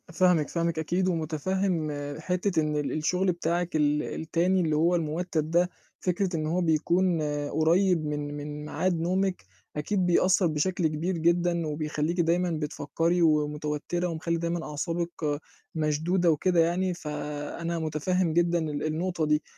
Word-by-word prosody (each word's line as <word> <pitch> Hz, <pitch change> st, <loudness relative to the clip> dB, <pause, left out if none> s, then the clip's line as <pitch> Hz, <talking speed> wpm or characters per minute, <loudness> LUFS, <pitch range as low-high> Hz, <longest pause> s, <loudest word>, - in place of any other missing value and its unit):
فاهمِك، 180 Hz, -4 st, +3 dB
فاهمِك 170 Hz, -1 st, -1 dB
أكيد، 175 Hz, +4 st, 0 dB
ومُتفهِّم 165 Hz, 0 st, -1 dB, 0.3 s
حتّة 180 Hz, +1 st, 0 dB
إن 150 Hz, -1 st, -1 dB
ال 145 Hz, -1 st, -1 dB
الشُغل 180 Hz, +4 st, +1 dB
بتاعِك 170 Hz, 0 st, -1 dB
ال 150 Hz, 0 st, +2 dB
التاني 175 Hz, +4 st, 0 dB
اللي 155 Hz, -3 st, +1 dB
هو 170 Hz, +3 st, +3 dB
المُوتّد 160 Hz, -1 st, -1 dB
ده، 175 Hz, +1 st, +3 dB, 0.3 s
فكرة 180 Hz, 0 st, 0 dB
إن 155 Hz, -1 st, -1 dB
هو 175 Hz, +3 st, 0 dB
بيكون 170 Hz, +1 st, +2 dB, 0.3 s
قريّب 170 Hz, +1 st, +2 dB
من 145 Hz, -1 st, -3 dB
من 150 Hz, 0 st, -6 dB
ميعاد 175 Hz, +2 st, 0 dB
نومِك، 185 Hz, +2 st, 0 dB, 0.3 s
أكيد 185 Hz, +5 st, 0 dB
بيأثّر 180 Hz, +1 st, +4 dB
بشكل 165 Hz, +3 st, +1 dB
كبير 165 Hz, +4 st, -2 dB
جدًا، 170 Hz, 0 st, +2 dB
وبيخلّيكِ 155 Hz, +3 st, -2 dB
دايمًا 175 Hz, +2 st, +2 dB
بتفكّري 160 Hz, +2 st, -1 dB
ومتوتّرة 150 Hz, +2 st, 0 dB
ومخلّي 170 Hz, 0 st, -2 dB
دايمًا 170 Hz, 0 st, -2 dB
أعصابِك 165 Hz, -1 st, -2 dB, 0.4 s
مشدودة 160 Hz, +3 st, +2 dB
وكده 175 Hz, +3 st, +2 dB
يعني، 175 Hz, +3 st, +2 dB
فأنا 150 Hz, +1 st, -4 dB
مُتفهِّم 160 Hz, +3 st, 0 dB
جدًا 175 Hz, +1 st, +3 dB
ال 150 Hz, -3 st, -3 dB
النقطة 165 Hz, +1 st, -1 dB
دي. 150 Hz, 0 st, +2 dB
165 Hz, 140 wpm, -27 LUFS, 155-180 Hz, 0.4 s, بيأثّر